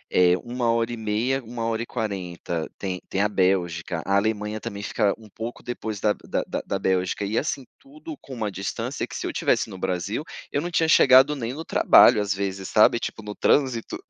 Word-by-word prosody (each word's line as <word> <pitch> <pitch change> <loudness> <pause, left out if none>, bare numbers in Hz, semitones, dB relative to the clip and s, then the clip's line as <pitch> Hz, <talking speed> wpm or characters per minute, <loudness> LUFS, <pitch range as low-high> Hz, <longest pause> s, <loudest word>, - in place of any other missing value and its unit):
eh, 90 -1 +5
1 120 0 -2
hora 115 0 0
e - - -5
meia, 115 +5 -1
1 115 0 -5
hora 115 0 -1
e - - -3
40, 90 -7 -4
tem 95 -2 -4
tem 95 - -2
a 105 - +3
Bélgica. 90 -4 0
A 100 - +1
Alemanha 105 0 -1
também 100 -3 -6
fica 105 -1 +1
um 110 - -15
pouco 115 +3 -7
depois 110 -4 -5
da 105 +1 +2
da - - -3 0.2
da 100 - -2
Bélgica 95 +1 0
e, 105 +3 -3
assim, 140 -2 -3
tudo 300 +3 -10
com 135 - -10
uma 110 -3 -2
distância 95 +1 -4
que - - -9
se - - -4
eu - - -3
tivesse - - +1
no 95 - -9
Brasil, 95 +7 -2 0.3
eu 145 - 0
não 175 - -3
tinha 165 -2 +1
chegado 135 -1 +6
nem 120 -1 -4
no 160 +3 -7
trabalho 105 - +6
às 100 -1 -2
vezes, 95 -1 -4
sabe, 110 +2 +5
tipo, 110 - -5
no 105 0 -6
trânsito. 130 -5 +1
110 Hz, 210 wpm, -24 LUFS, 95-120 Hz, 0.3 s, chegado